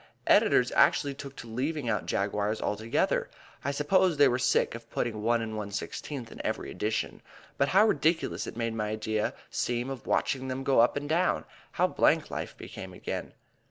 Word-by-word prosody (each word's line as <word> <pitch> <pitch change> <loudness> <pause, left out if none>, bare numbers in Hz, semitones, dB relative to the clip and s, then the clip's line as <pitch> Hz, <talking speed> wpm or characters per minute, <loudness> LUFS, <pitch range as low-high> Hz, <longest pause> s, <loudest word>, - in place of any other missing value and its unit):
Editors - - +4
actually 140 -1 +4
took 140 0 -9
to 115 - -9
leaving 135 +4 -2
out 105 -3 -1
Jaguars 105 +2 0
altogether. 110 +2 0 0.3
I 140 - -1
suppose 165 +4 +2
they 145 -1 +7
were 125 0 +1
sick - - +2
of 115 0 -9
putting 110 -3 -2
1 115 +2 +2
1/16 110 +4 -5
in - - -7
every - - -3
edition. 110 +1 -2 0.4
But 140 - +4
how 195 +7 +5
ridiculous 160 -4 +1
it - - -7
made 115 -1 -1
my 105 -2 -2
idea 110 0 -1 0.2
seem 120 +2 -1
of 135 - -7
watching 130 -1 0
them 130 +1 -3
go 135 -2 +3
up 120 +4 +4
and 145 0 -3
down! 170 +4 +1 0.3
How - - +3
blank - - +2
life - - -5
became - - -8
again! - - -5
125 Hz, 175 wpm, -29 LUFS, 110-145 Hz, 0.4 s, they